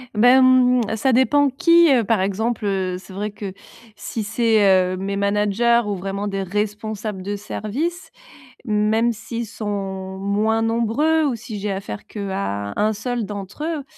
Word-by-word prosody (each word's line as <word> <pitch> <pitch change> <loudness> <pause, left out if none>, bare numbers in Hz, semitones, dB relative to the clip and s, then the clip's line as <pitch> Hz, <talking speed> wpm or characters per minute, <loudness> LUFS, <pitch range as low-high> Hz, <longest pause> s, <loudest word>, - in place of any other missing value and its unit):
Beh, 245 +4 +6
mmh, 250 -3 +4
ça 260 +4 +1
dépend 280 +3 +4
qui. 335 +4 +5
Heu, 240 -4 +4
par 215 -2 +1
exemple, 210 +3 -1
heu, 185 -2 -1
c'est 190 - -13
vrai 205 +2 -3
que, 205 -2 -7 0.4
si 225 - -5
c'est, 225 +1 +2 0.3
heu, - - -2
mes 195 +1 -3
managers 210 +4 +2
ou 205 - -1
vraiment 195 +2 -4
des 195 -1 -2
responsables 210 0 -3
de 205 +1 -3
service. 280 - -4 0.5
Même 220 +2 +2
s'ils 230 +1 -5
sont 195 -3 -5
moins 215 +3 0
nombreux 235 +8 +1
ou 260 -4 0
si 215 -2 -7
j'ai 205 0 -2
affaire 105 - -6
qu'à 190 - -4
1 215 +1 +1
seul 235 +2 -3
d'entre 205 +7 -7
eux, 320 -4 -3
210 Hz, 160 wpm, -21 LUFS, 200-235 Hz, 0.5 s, Beh